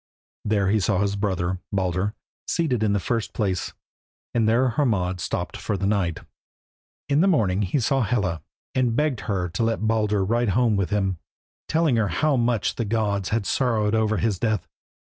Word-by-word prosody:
There 100 -2 +1
he 110 +2 +3
saw 95 -1 +1
his 100 0 0
brother, 95 -3 -1
Baldur, 95 +2 -1 0.3
seated 140 -9 0
in 105 -2 +2
the 100 - +2
first 115 +2 -2
place, 95 -5 -1 0.6
and 115 -2 +2
there 125 +3 +3
Hermod 105 -9 0
stopped 90 0 -4
the 100 -2 0
night. 100 -5 0 0.9
In 145 +2 +3
the 190 - +4
morning 105 - +2
he 100 +8 0
saw 135 +3 +1
Hela, 100 -8 0 0.3
and 125 -3 +1
begged 150 -3 +1
her 95 -3 0
to 85 - -3
let 115 -1 0
Baldur 105 -3 +1
ride 120 +2 +1
home 120 -4 +3
with 100 -2 0
him, 95 -4 0 0.5
telling 160 -6 +2
her 110 -2 +2
how 140 - +1
much 120 -4 0
the 115 - 0
gods 100 -3 -1
had 115 -2 0
sorrowed 110 -5 +1
over 110 -1 +2
his 105 -4 0
death. 110 -2 0
105 Hz, 175 wpm, -24 LUFS, 95-120 Hz, 0.9 s, the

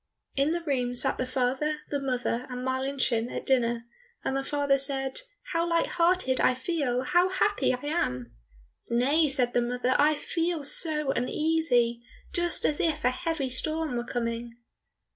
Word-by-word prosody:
In 275 +2 +2
the 340 +1 -2
room 250 -5 -1
sat 270 +2 +2
the 255 - -1
father, 265 +4 -1
the 285 - -1
mother, 250 -2 -2
and 250 0 -5
Marlinchen 260 -3 0
at - - -5
dinner, 235 -3 +1 0.4
and 265 - -1
the 270 - 0
father 285 -1 +1
said, 270 - +3 0.3
"How 335 +1 0
light 335 0 +2
hearted 340 -7 +1
I 255 - +3
feel, 260 -3 -1
how 355 +6 +3
happy 405 +2 +1
I 250 +2 -4
am!" 125 - -2 0.5
"Nay," 275 +7 +3
said 255 -4 +1
the 245 - +3
mother, 250 +1 0
"I 300 +1 +4
feel 330 +1 -2
so 300 0 +1
uneasy, 250 -3 +1 0.3
just 345 -1 +1
as 295 - +1
if 310 -3 0
a 250 - +4
heavy 300 -2 -2
storm 310 +1 -2
were 240 - -1
coming." 235 -1 -4
270 Hz, 160 wpm, -27 LUFS, 250-310 Hz, 0.5 s, I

